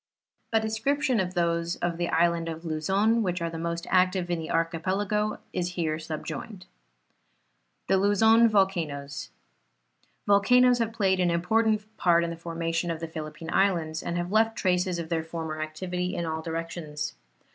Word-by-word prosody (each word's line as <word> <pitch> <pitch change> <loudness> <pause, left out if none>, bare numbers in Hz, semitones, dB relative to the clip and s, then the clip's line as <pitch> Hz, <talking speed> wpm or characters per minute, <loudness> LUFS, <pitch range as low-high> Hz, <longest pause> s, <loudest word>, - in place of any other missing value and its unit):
A 225 - +4
description 240 +4 0
of 185 0 -2
those 170 0 0
of 175 -1 -2
the 175 0 -1
Island 170 0 +2
of 165 +1 -7
Luzon, 195 +9 +1
which 180 -3 -1
are 170 0 -2
the 165 - -5
most 170 0 -3
active 185 -1 +2
in 170 - 0
the 160 - -6
archipelago, 190 +6 0 0.2
is 180 0 -2
here 160 -3 -1
sub 155 -1 -6
joined. 195 -5 -7 1.2
THE 195 - +3
LUZON 220 +4 +5
VOLCANOES. 160 -9 -1 1.0
Volcanoes 245 +5 +5
have 230 -1 0
played 195 -4 +1
an 180 -1 +3
important 215 +5 +1
part 170 -1 +4
in 170 - -2
the - - -5
formation 165 0 -2
of 165 -1 -2
the 165 - -4
Philippine 160 0 -7
Islands 170 -5 +1
and 170 - -3
have 175 +1 -3
left 225 +1 +3
traces 180 -1 +1
of 165 -1 -5
their 165 -2 0
former 160 -1 -5
activity 180 +3 -3
in 170 - -2
all 160 0 -3
directions. 165 -2 -4
175 Hz, 165 wpm, -27 LUFS, 165-200 Hz, 1.2 s, LUZON